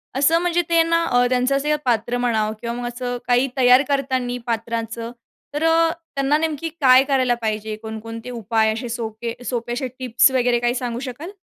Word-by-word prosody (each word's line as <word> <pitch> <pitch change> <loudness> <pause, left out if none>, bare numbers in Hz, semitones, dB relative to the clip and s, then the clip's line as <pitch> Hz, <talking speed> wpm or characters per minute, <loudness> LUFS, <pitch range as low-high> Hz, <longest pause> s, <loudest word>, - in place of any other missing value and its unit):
असं 290 +5 +4
म्हणजे 350 0 +1
ते 335 -1 +4
ना 335 0 +1
अ, 245 -3 +3
त्यांचं 255 +2 +1
असं 300 +2 +1
पात्र 240 0 0
म्हणा 225 -3 0
किंवा 235 0 -3
मग 245 0 -4
असं 245 0 -4
काही 245 +2 +3
तयार 250 +1 +6
करताना 260 -3 -1
पात्रांचं 230 0 -3 0.4
तर 295 +2 -2
अ, 325 0 +4 0.3
त्यांना 275 +2 +2
नेमकी 320 0 -2
काय 255 0 +7
करायला 260 -3 +1
पाहिजे? 215 -1 -2
कोणकोणते 225 +2 -7
उपाय 225 -2 0
असे 235 +2 -5
सोपे 230 0 -4
सोपे 240 -1 -3
असे 260 +1 -2
टिप्स 250 +1 +3
वगैरे 245 -2 +2
काही 240 +1 0
सांगू 240 -2 -3
शकाल? 310 +10 -8
245 Hz, 180 wpm, -21 LUFS, 230-275 Hz, 0.4 s, काय